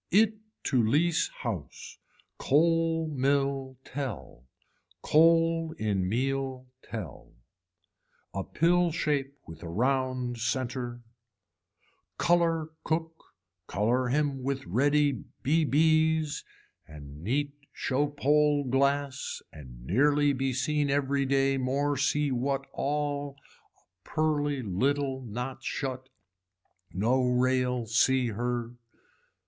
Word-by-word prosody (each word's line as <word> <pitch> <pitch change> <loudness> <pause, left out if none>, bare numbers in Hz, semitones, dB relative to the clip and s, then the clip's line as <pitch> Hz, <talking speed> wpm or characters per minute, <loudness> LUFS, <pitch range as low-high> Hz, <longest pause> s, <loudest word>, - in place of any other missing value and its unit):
It 215 +2 +3 0.2
to 130 -4 +2
lease 155 +9 +2
house. 100 - -7 0.4
Coal 165 +2 +2
mill 135 -2 0
tell. 125 - -6 0.6
Coal 165 0 +3
in 100 -4 0
meal 130 +2 -1 0.2
tell. 100 -11 -8 1.0
A 95 - -2
pill 175 - +2
shape 145 -3 -1
with 80 -1 -11
a 85 - -7
round 130 +3 0
center. 120 0 -3 1.1
Color 170 -2 +2
Cook 160 0 -1 0.5
color 120 +5 +1
him 140 0 0
with 135 +1 -3
ready 140 +8 +2 0.2
bbs 155 0 +2 0.4
and 75 -1 -11
neat 140 +7 -1 0.2
show 145 +2 0
pole 145 0 +2
glass 140 +1 0
and 60 -5 -12
nearly 145 - +3
be 135 0 -1
seen 145 +3 0
every 140 0 +1
day 135 0 +2
more 140 +3 0
see 145 +1 +1
what 135 +2 -1
all 145 -1 -2 0.4
a - - -26
pearly 145 -3 0
little 130 +7 0
not 125 +2 -6
shut, 130 -1 -4 0.8
no 115 +8 +1
rail 125 -1 +1
see 125 +2 +2
her. 120 +1 -2
135 Hz, 100 wpm, -28 LUFS, 125-150 Hz, 1.1 s, It